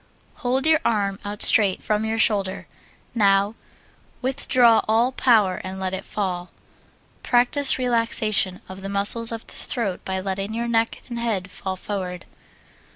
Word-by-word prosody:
Hold 260 +3 -1
your 315 -1 +4
arm 200 -3 0
out 205 0 -2
straight 200 -4 +4
from 215 0 -1
your 220 0 -1
shoulder. 200 -4 +1 0.5
Now 200 -1 +3 0.7
withdraw 255 -3 +3
all 230 +4 +3
power 220 -8 +2
and 190 +1 -6
let 190 0 -3
it 190 - -5
fall. 180 -3 -3 0.7
Practise 255 +3 +2
relaxation 230 -6 +1
of 190 +1 -10
the 195 - -5
muscles 205 +4 +2
of 230 0 -6
the - - -8
throat 205 -7 -2
by 190 0 -3
letting 195 +3 -4
your 235 +1 -2
neck 230 -1 0
and 240 -2 -5
head 200 -6 -2
fall 190 0 -5
forward. 185 -2 -5
210 Hz, 150 wpm, -23 LUFS, 190-235 Hz, 0.7 s, your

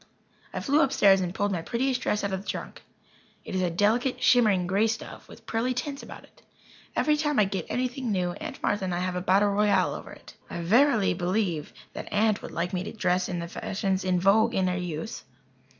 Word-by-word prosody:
I - - -4
flew 290 +2 +3
upstairs 200 -9 +4
and 180 -1 -2
pulled 205 +2 -1
my 175 -4 -1
prettiest 255 +7 -1
dress 210 - 0
out 200 -1 -1
of 190 - -1
my 195 - -13
trunk. - - -5 0.6
It - - -7
is 185 - 0
a 180 - +1
delicate, 220 +9 +1
shimmering 215 -7 +4
grey 195 +5 +2
stuff 225 +1 -5
with - - -15
pearly 245 +3 -1
tints 275 +3 -4
about - - -10
it. - - -22 0.5
Every 300 - +3
time 295 -2 0
I 210 - +5
get 190 -3 -4
anything 250 -1 -2
new, 180 -3 0
Aunt - - -8
Martha 205 -2 0
and 180 -2 -2
I - - -1
have 185 0 -2
a 180 - -2
battle 195 +3 +3
royal 200 -2 +2
over - - -8
it. - - -13 0.2
I 170 - -5
verily 225 +4 +3
believe 180 -3 -1 0.2
that - - -7
Aunt 215 0 +2
would - - -7
like 175 +2 -3
me 180 -1 -1
to 210 - -5
dress 180 -4 0
in 180 - -2
the 170 0 -4
fashions 190 +2 -2
in 185 -1 +1
vogue 220 +5 +3
in 190 - +2
her 180 0 0
youth. 180 +2 -5
200 Hz, 220 wpm, -27 LUFS, 180-225 Hz, 0.6 s, I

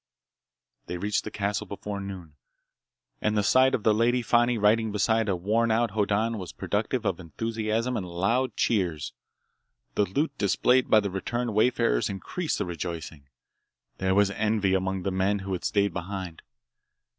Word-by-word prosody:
They 90 - -4
reached 105 +3 -1
the - - -3
castle 105 +1 -2
before 100 +1 -5
noon, 95 -5 -8 0.9
and 105 0 +1
the 105 - +2
sight 130 +4 +4
of 110 - -4
the 110 - +4
Lady 120 +3 +2
Fani 120 +1 +3
riding 110 +1 +3
beside 110 +1 +1
a 95 - +2
worn 110 +6 +1
out 115 0 +2
Hoddan 105 +2 0
was 90 -2 -7
productive 110 +5 -2
of 95 -3 0
enthusiasm 115 +6 -2
and 95 -5 -3
loud 105 +8 0
cheers. 90 -9 0 0.8
The 105 - +2
loot 140 - -1
displayed 125 +6 +3
by 110 - +6
the 100 -2 -3
returned 120 +5 -2
wayfarers 105 - +2
increased 155 - -3
the - - -1
rejoicing. 85 -4 -6 0.7
There 95 0 +1
was 100 0 +4
envy 105 -2 +1
among 95 0 -1
the 95 - -1
men 95 +2 +1
who 95 - -3
had 90 - -4
stayed 100 -1 +1
behind. 90 -2 -5
105 Hz, 160 wpm, -27 LUFS, 95-115 Hz, 0.9 s, by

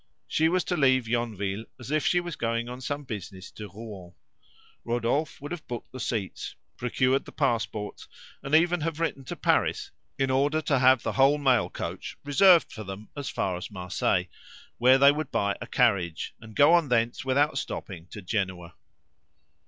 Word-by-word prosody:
She 160 +1 +2
was 180 0 +1
to 180 - -1
leave 130 -5 +3
Yonville 110 -3 -2
as 120 +3 -8
if 155 -1 +1
she 180 - +3
was 175 -3 -5
going 115 0 -1
on 125 +1 -7
some 145 +2 -3
business 95 -6 -7
to 105 -1 -9
Rouen. 100 -3 -10 0.7
Rodolphe 120 +6 -1
would 145 +1 -8
have 175 -3 -6
booked 120 -1 -6
the 130 - -8
seats, 110 -5 -3 0.2
procured 130 +2 +1
the - - -10
passports, 110 -3 -2 0.3
and 135 +3 +1
even 175 +1 +3
have 165 0 -2
written 165 -5 -2
to - - -5
Paris - - +1 0.3
in 135 -1 +1
order 145 +4 +2
to 145 -3 +1
have 130 -1 +5
the - - -1
whole 135 +2 +4
mail 130 -5 +2
coach - - -6
reserved 170 +5 +5
for 110 - -7
them 95 +2 -8
as 140 -3 -4
far 95 -2 -1
as 90 - -7
Marseilles, 90 -3 0 0.5
where 130 +2 +6
they 140 +1 +7
would 150 -1 -3
buy 100 0 0
a - - -6
carriage, 100 -9 +1
and 110 -1 -12
go 145 +4 +6
on 170 -5 +4
thence 115 -1 +1
without 135 +2 +2
stopping 90 -4 -6
to 105 0 -10
Genoa. 90 -4 -3
125 Hz, 180 wpm, -27 LUFS, 105-145 Hz, 0.7 s, they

